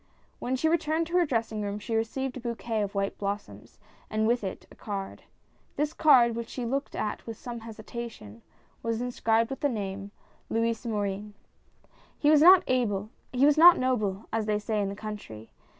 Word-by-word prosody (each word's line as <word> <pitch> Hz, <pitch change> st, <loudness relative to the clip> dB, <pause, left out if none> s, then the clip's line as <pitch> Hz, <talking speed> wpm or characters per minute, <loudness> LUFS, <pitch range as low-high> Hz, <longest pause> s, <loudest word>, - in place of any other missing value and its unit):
When 255 Hz, -, -1 dB
she 290 Hz, +5 st, +1 dB
returned 320 Hz, 0 st, +1 dB
to 350 Hz, +2 st, 0 dB
her 350 Hz, -2 st, +3 dB
dressing 225 Hz, -4 st, -1 dB
room 205 Hz, 0 st, -3 dB
she 210 Hz, +2 st, -5 dB
received 250 Hz, +4 st, -2 dB
a -, -, -5 dB
bouquet 235 Hz, -2 st, -3 dB
of 200 Hz, 0 st, -3 dB
white 195 Hz, 0 st, -1 dB
blossoms, 200 Hz, +1 st, -5 dB, 0.3 s
and 215 Hz, 0 st, 0 dB
with 235 Hz, 0 st, +2 dB
it 190 Hz, -, -5 dB
a -, -, -14 dB
card. 195 Hz, -2 st, -6 dB, 0.5 s
This 300 Hz, +1 st, -1 dB
card, 245 Hz, -8 st, +5 dB
which 235 Hz, 0 st, -5 dB
she 250 Hz, -, -4 dB
looked 275 Hz, +4 st, -2 dB
at 210 Hz, -, -3 dB
with 225 Hz, -2 st, -6 dB
some 240 Hz, -1 st, -7 dB
hesitation, 220 Hz, -, -8 dB, 0.4 s
was 230 Hz, -1 st, -1 dB
inscribed 230 Hz, -2 st, +1 dB
with 270 Hz, -, -4 dB
the 290 Hz, -, +1 dB
name, 200 Hz, -3 st, -4 dB, 0.4 s
LOUIS 230 Hz, +1 st, -1 dB
MORIN. 205 Hz, -1 st, -3 dB, 0.8 s
He 295 Hz, -, +3 dB
was 300 Hz, -1 st, +6 dB
not 275 Hz, -, +5 dB
noble, 215 Hz, -6 st, 0 dB
as 220 Hz, -1 st, 0 dB
they 210 Hz, -1 st, +2 dB
say 210 Hz, 0 st, -1 dB
in 200 Hz, -, -1 dB
the 200 Hz, -, -5 dB
country. 205 Hz, -, -8 dB
225 Hz, 170 wpm, -28 LUFS, 210-255 Hz, 0.8 s, was